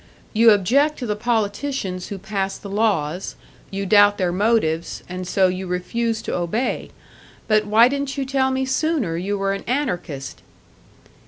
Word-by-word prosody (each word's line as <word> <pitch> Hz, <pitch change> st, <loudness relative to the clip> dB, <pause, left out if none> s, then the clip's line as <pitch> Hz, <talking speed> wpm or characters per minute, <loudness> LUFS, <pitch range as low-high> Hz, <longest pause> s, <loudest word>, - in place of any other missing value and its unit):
"You 230 Hz, +1 st, +6 dB
object 265 Hz, +10 st, +3 dB
to 250 Hz, -, -4 dB
the 210 Hz, -2 st, -1 dB
politicians 210 Hz, -3 st, -2 dB
who 200 Hz, -, -5 dB
pass 195 Hz, 0 st, -3 dB
the 200 Hz, -, -9 dB
laws, 195 Hz, -5 st, 0 dB, 0.3 s
you 195 Hz, 0 st, -4 dB
doubt 205 Hz, 0 st, +5 dB
their 180 Hz, -3 st, 0 dB
motives 185 Hz, -5 st, 0 dB
and 180 Hz, 0 st, -6 dB
so 190 Hz, 0 st, +3 dB
you 185 Hz, +1 st, -3 dB
refuse 220 Hz, +6 st, -2 dB
to -, -, -3 dB
obey. 180 Hz, +9 st, -2 dB, 0.6 s
But 215 Hz, -1 st, +2 dB
why 225 Hz, +3 st, +6 dB
didn't 280 Hz, +1 st, -3 dB
you 275 Hz, -, -1 dB
tell 265 Hz, 0 st, +1 dB
me 265 Hz, 0 st, 0 dB
sooner 260 Hz, -, 0 dB
you 195 Hz, +4 st, -2 dB
were 195 Hz, 0 st, 0 dB
an 195 Hz, -, -5 dB
anarchist?" 180 Hz, -, -3 dB
205 Hz, 160 wpm, -22 LUFS, 185-240 Hz, 0.6 s, You